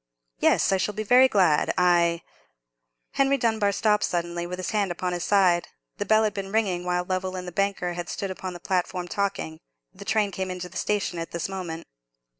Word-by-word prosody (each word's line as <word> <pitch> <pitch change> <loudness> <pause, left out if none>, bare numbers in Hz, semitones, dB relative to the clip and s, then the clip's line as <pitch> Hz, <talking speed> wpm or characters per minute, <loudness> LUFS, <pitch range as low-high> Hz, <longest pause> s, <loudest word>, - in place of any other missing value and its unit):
"Yes, - - +3
I 195 - +3
shall 205 +2 -2
be 215 - -2
very 250 +5 +6
glad; 185 -10 +3
I——" 170 -1 +3 0.9
Henry 275 0 +2
Dunbar 220 -4 +1
stopped 210 +1 +2
suddenly, 175 0 -2
with 180 +1 -5
his 185 - -3
hand 205 -3 +1
upon 180 +1 -2
his 175 0 -3
side. 180 -3 +3 0.3
The - - -2
bell 220 0 +5
had 215 - 0
been 195 -1 -5
ringing 195 -5 0
while 180 0 0
Lovell 185 0 -2
and 180 -1 -5
the - - -5
banker 195 -2 -1
had 175 0 -5
stood 195 -1 -3
upon 185 0 -6
the 175 - -9
platform 180 0 -1
talking. 195 -5 -2 0.3
The 200 +1 -10
train 210 -1 +1
came 190 0 -3
into 180 -1 -5
the 180 - -17
station 200 -4 -1
at 165 - -4
this 170 -1 -3
moment. 175 -4 -6
185 Hz, 205 wpm, -25 LUFS, 175-205 Hz, 0.9 s, very